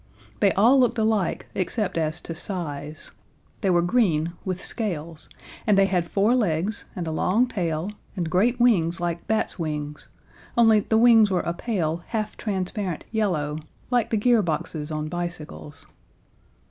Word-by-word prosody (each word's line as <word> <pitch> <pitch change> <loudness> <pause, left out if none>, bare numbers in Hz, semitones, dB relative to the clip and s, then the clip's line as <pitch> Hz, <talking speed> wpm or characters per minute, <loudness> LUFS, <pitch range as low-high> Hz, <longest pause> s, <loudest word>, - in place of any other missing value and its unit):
They 200 -2 +4
all 240 +7 +5
looked 245 -2 +3
alike 215 -5 0
except 195 +1 -1
as 160 0 0
to 165 - -6
size. 155 -4 -4 0.5
They 195 - +1
were 175 -1 +3
green 170 -6 +1
with 185 -1 -3
scales, 170 -8 -4 0.4
and 210 -2 +4
they 195 - +6
had 180 -3 0
four 205 +4 +3
legs 200 -2 0
and 175 - -3
a 160 - -3
long 195 +9 +2
tail 175 -4 -2 0.2
and 175 -4 -2
great 220 +9 +2
wings 185 -8 +3
like 170 -1 -3
bats' 220 -3 -1
wings, 150 -2 -4 0.5
only 225 -2 +6
the 220 +2 +1
wings 225 -2 +6
were 180 -2 +1
a 170 - -1
pale, 170 -5 -1
half 215 -2 -3
transparent 190 -3 -3
yellow, 165 -9 -1 0.3
like 245 -3 +2
the 220 - +1
gear 235 +1 +4
boxes 155 -3 -3
on 155 -1 -3
bicycles. 155 - -6
185 Hz, 155 wpm, -24 LUFS, 160-220 Hz, 0.5 s, they